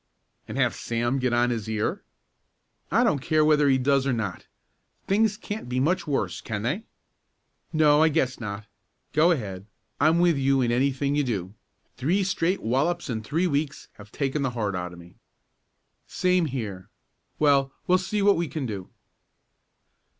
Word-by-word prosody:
"And - - -6
have - - +2
Sam 120 +3 -1
get 130 -1 0
on 120 +1 +2
his 110 -2 -3
ear?" 110 -1 -1 0.9
"I - - +3
don't 145 - +2
care 155 +3 +2
whether 150 -2 +4
he 135 - +4
does 135 +1 +2
or 135 - +1
not. 105 -6 -4 0.6
Things 210 +1 +2
can't 210 - -6
be 125 +1 -1
much 170 +5 +1
worse; 105 - -1
can 105 -2 -4
they?" 185 - -2 0.9
"No, 150 -2 +4
I 160 - +5
guess 130 -3 0
not. 105 -2 -5 0.5
Go 155 +3 +5
ahead. 100 - -2 0.3
I'm 155 +3 +4
with 170 -3 +3
you 135 0 +2
in 120 -1 +1
anything 135 +3 +1
you 145 0 +2
do. 100 -7 -3 0.4
Three 180 +9 +1
straight 185 0 0
wallops 140 +7 0
in 110 -2 -2
three 155 +11 -1
weeks 145 -3 -2
have 100 0 -13
taken 140 +1 -1
the 135 - +1
heart 105 -3 -1
out 90 -1 -4
of 90 - -12
me." 85 0 -15 0.9
"Same 180 -1 +1
here. 105 -9 -5 0.5
Well, 140 -2 +3
we'll 185 +1 +4
see 200 +2 -1
what 200 -2 +5
we 170 0 -1
can 150 -2 -4
do." 100 -6 -5
135 Hz, 170 wpm, -25 LUFS, 115-160 Hz, 0.9 s, I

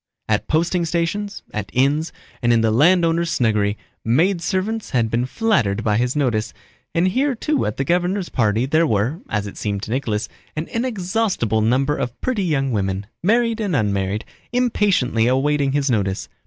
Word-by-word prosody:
At 110 -1 0
posting 170 +2 +1
stations, 175 +5 -2
at 105 -3 -4
inns, 145 +5 +2 0.3
and 120 -1 +2
in 115 -1 +4
the 110 -1 +2
landowner's 170 +5 +3
snuggery, 105 -7 +1 0.3
maidservants 185 - 0
had 115 -2 +1
been 120 +2 0
flattered 130 - +1
by 105 -1 +2
his 125 +3 0
notice, 120 -7 0 0.4
and 175 +3 +3
here 265 +6 +1
too 300 +6 0
at 105 - -4
the 135 - 0
governor's 180 +4 0
party 110 0 +1
there 160 +4 +2
were 115 - 0
(as 105 -1 -1
it 100 - -8
seemed 100 -1 -3
to 110 - -5
Nicholas) 115 -4 -1 0.3
an 155 +2 -3
inexhaustible 200 - 0
number 130 +6 +2
of 125 -4 -4
pretty 245 -6 -1
young 135 -6 0
women, 95 -2 -1 0.2
married 230 +4 +2
and 200 -7 -1
unmarried, 100 -2 0 0.3
impatiently 205 - +2
awaiting 135 +2 +1
his 145 -1 +1
notice. 100 -4 -1
140 Hz, 165 wpm, -21 LUFS, 110-185 Hz, 0.4 s, in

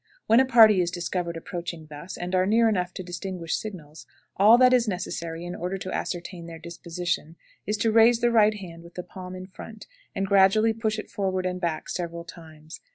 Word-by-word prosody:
When 225 - +5
a 265 - +5
party 220 -6 +7
is 175 - 0
discovered 175 -1 -3
approaching 170 -2 -6
thus, 155 +4 -9
and 180 +1 -5
are 185 0 +2
near 225 +2 +4
enough 185 -4 0
to 185 - -5
distinguish 175 -1 -4
signals, 160 -8 -8 0.3
all 215 +4 +7
that 255 0 +6
is 240 -2 +3
necessary 170 -3 -4
in 175 - -5
order 180 +3 -3
to 185 0 -6
ascertain 175 -1 -5
their 165 -1 -8
disposition 170 -1 -4 0.3
is 210 +1 0
to 225 +2 +1
raise 230 +1 +5
the 240 0 +2
right 215 -2 +4
hand 175 -5 -9
with 170 0 -15
the 180 - -5
palm 185 -1 -9
in 185 0 -8
front, 215 +3 -11 0.3
and 195 - -1
gradually 200 +3 +4
push 220 -1 -2
it 215 - -7
forward 190 -2 -1
and 180 0 -3
back 170 -3 -2
several 170 -1 -4
times. 160 -2 -12
185 Hz, 205 wpm, -26 LUFS, 170-215 Hz, 0.3 s, party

